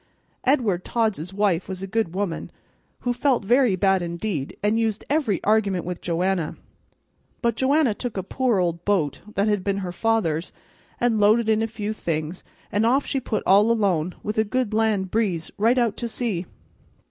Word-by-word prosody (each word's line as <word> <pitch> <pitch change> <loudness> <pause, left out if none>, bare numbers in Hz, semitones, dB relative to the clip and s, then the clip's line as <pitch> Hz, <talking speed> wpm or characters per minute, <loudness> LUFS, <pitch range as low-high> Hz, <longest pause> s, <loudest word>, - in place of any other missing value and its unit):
Edward 230 -10 +2
Todd's 215 -7 -1
wife 195 -3 0
was 190 0 -5
a - - -1
good 195 -3 -1
woman, 195 -4 -3 0.5
who 245 - 0
felt 245 -3 +1
very 245 -2 +4
bad 190 0 +2
indeed, 170 -3 -3
and 210 +2 +2
used 220 -2 -1
every 280 - +1
argument 200 -4 +2
with 180 0 -5
Joanna; 175 -1 -1 0.9
but 235 -1 +2
Joanna 270 0 +3
took 235 0 -5
a 190 - -1
poor 245 +3 0
old 170 -2 0
boat 180 -8 0
that 200 +2 +2
had 205 -3 +1
been 195 0 0
her 185 -3 -3
father's 180 -5 0 0.5
and 235 -3 +2
lo'ded 220 +2 +4
in 220 0 +3
a 225 - 0
few 215 -1 -4
things, 165 -3 -3 0.3
and 205 +2 +1
off 260 +5 +3
she 275 - -1
put 225 -4 -2
all 205 +3 +5
alone, 185 -7 +1
with 210 +1 -2
a - - +5
good 230 0 -1
land 215 -4 +1
breeze, 190 -8 -1
right 230 +4 +3
out 235 -4 +2
to 235 - -3
sea. 220 -7 -3
210 Hz, 180 wpm, -24 LUFS, 185-230 Hz, 0.9 s, all